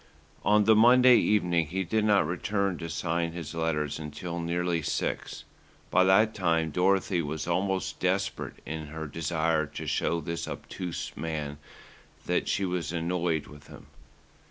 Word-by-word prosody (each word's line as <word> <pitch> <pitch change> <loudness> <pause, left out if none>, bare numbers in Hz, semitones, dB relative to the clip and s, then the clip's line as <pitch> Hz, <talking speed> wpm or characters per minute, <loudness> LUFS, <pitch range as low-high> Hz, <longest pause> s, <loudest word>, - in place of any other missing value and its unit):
On 105 0 +4
the 110 +1 +5
Monday 125 +2 +7
evening 85 -6 +2
he 95 +5 -2
did 110 +5 0
not 100 -5 +4
return 100 +2 -1
to 85 - -5
sign 85 0 -1
his 85 -1 -6
letters 80 -3 -1
until 80 +3 -5
nearly 85 0 -1
six. 75 - -3 0.5
By 95 - +5
that 105 +4 +4
time 80 -4 +1
Dorothy 95 +1 +2
was 80 0 -4
almost 95 +2 -1
desperate - - -1
in 80 0 -5
her 80 +1 -6
desire 80 0 0
to - - -7
show 85 - 0
this 85 +1 -4
obtuse 90 -3 -6
man 75 -3 -4 0.7
that - - 0
she 100 - 0
was 90 -2 -2
annoyed 85 -2 -1
with 75 -1 -14
him. - - -13
85 Hz, 150 wpm, -28 LUFS, 80-95 Hz, 0.7 s, Monday